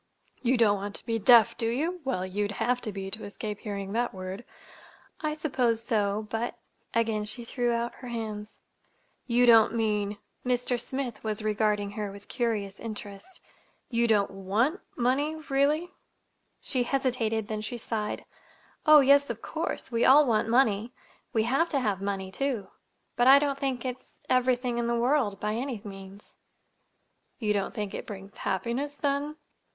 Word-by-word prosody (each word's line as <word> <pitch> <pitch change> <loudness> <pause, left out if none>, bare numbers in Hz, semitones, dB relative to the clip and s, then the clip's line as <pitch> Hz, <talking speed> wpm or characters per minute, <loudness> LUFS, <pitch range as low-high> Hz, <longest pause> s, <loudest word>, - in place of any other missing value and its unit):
"You 255 0 +2
don't 210 -3 +4
want 205 +1 -5
to - - -10
be 225 -1 -1
deaf, 230 +1 +7
do 225 - 0
you? 325 +9 -1
Well, 250 -9 -1
you'd 205 +2 -2
have 250 +4 0
to 215 - -4
be, 195 -1 -6
to 220 - -3
escape 210 0 -5
hearing 200 -3 -5
that 240 -2 0
word." 185 +3 -6 0.8
"I 305 -1 -1
suppose 250 -7 0
so. 210 -3 0
But—" 235 +1 -2 0.3
again 225 -2 +1
she 225 +3 -3
threw 240 0 0
out 235 0 -1
her 250 - -7
hands. 215 -3 -5 0.7
"You 245 0 +4
don't 230 -1 +6
mean—" 210 -2 0 0.3
Mr. 245 -1 0
Smith 260 -2 -4
was 215 -1 -2
regarding 210 -1 +1
her 205 -1 -4
with 200 0 -13
curious 215 -5 -2
interest. 210 - -8 0.5
"Don't 235 0 +2
you 205 -2 +4
want—money, 255 - 0
really?" 295 +6 +2 0.7
She 255 - -1
hesitated; 240 -4 0
then 215 -1 -3
she 225 +3 -4
sighed. 215 -2 -3 0.6
"Oh, 305 -1 +9
yes, 280 +1 +5
of - - -5
course. - - -3
We 230 0 +1
all 290 +3 +7
want 225 -3 +1
money. 230 -2 +2 0.4
We 220 -3 +2
have 275 +9 +2
to 280 - +2
have 205 -6 -1
money, 195 -1 -3
too; 250 -3 -2 0.5
but 245 +1 +3
I 270 +1 +10
don't 280 -1 0
think 265 -3 -2
it's—everything 250 -1 -1
in 235 - 0
the 235 - +1
world, 240 -6 +1
by 210 0 -1
any 245 0 -3
means." 195 0 -11 1.0
"You 215 -3 0
don't 200 +2 -2
think 210 -3 -3
it - - -6
brings 200 -1 -9
happiness, 235 +10 -2
then?" 285 +1 -1
230 Hz, 160 wpm, -28 LUFS, 210-255 Hz, 1.0 s, I